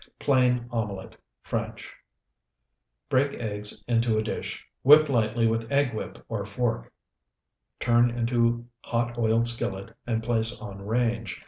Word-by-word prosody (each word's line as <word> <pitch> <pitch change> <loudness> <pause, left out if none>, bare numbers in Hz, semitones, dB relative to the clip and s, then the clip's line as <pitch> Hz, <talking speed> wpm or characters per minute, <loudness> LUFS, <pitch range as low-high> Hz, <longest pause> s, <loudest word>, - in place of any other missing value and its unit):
PLAIN 125 -3 +2
OMELET 105 -5 -4 0.3
(FRENCH) - - -4 1.2
Break 140 +2 +2
eggs 105 -2 -3
into 115 -2 +2
a 110 - +1
dish, 110 - -5 0.2
whip 150 +2 +7
lightly 115 -2 +2
with 115 +1 0
egg 140 -3 +2
whip 110 - -6
or 110 -3 -3
fork, 100 - -2 0.9
turn 120 0 +4
into 120 0 +1 0.2
hot 120 0 -1
oiled 115 +1 +2
skillet, 115 -2 -3
and 115 -1 -1
place 115 -1 0
on 100 -2 -8
range. 115 +1 -1
115 Hz, 125 wpm, -27 LUFS, 110-120 Hz, 1.2 s, whip